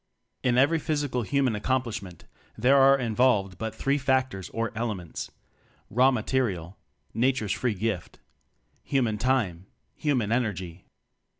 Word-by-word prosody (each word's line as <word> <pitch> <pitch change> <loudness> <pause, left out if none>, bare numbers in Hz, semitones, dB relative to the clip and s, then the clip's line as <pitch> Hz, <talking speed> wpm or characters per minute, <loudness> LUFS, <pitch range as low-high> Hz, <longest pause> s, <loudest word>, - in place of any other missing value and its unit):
In 125 -1 +2
every 145 +5 +4
physical 145 -5 -1
human 135 +1 +1
accom 130 +5 0
plishment, 105 -7 -7 0.4
there 125 +5 +4
are 135 0 +6
involved 110 -6 +1
but 110 -1 -4
three 140 +1 0
factors 130 -7 0
or 115 0 -2
elements: 105 -7 -4 0.6
raw 125 +4 +5
Ma 125 -5 -1
terial 95 -10 -1 0.4
(Nature's 120 -2 +1
free 120 -4 -1
gift); 105 -3 -3 0.6
human 120 -6 0
Time; 105 -9 0 0.3
human 125 -9 0
Energy. 95 -8 -2
120 Hz, 125 wpm, -27 LUFS, 105-130 Hz, 0.6 s, are